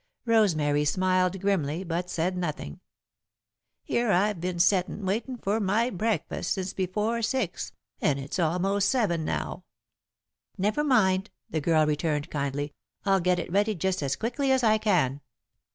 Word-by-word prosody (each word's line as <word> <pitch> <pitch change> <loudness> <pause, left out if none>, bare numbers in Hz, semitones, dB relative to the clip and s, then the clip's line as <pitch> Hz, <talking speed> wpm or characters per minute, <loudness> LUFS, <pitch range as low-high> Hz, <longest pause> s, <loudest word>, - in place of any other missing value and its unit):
Rosemary 160 -11 +3
smiled 185 +3 +1
grimly, 175 -4 0
but 175 0 -3
said 180 +1 -1
nothing. 155 - -4 1.0
"Here 235 -2 +1
I've 195 -1 +2
been 180 0 -2
settin', 185 +2 +2
waitin' 230 +7 -2
for 210 0 -1
my 220 +5 +1
breakfast, 200 -3 -1
since 190 -1 -4
before 210 +5 -1
six, 225 -5 -2 0.3
and 145 -2 +2
it's 140 +6 -5
almost 190 +4 +1
seven 205 -11 +1
now." - - -3 0.9
"Never 210 +10 +1
mind," 200 -8 +3 0.2
the 155 - -1
girl 155 0 +3
returned, 150 -1 -1
kindly; 145 0 -2 0.3
"I'll 195 -1 +4
get 180 0 +2
it 170 - -4
ready 205 +3 +2
just 190 +1 -1
as 140 -2 0
quickly 265 +4 -1
as 260 -1 +3
I 215 -1 +4
can." 155 -11 +1
185 Hz, 145 wpm, -27 LUFS, 165-210 Hz, 1.0 s, I'll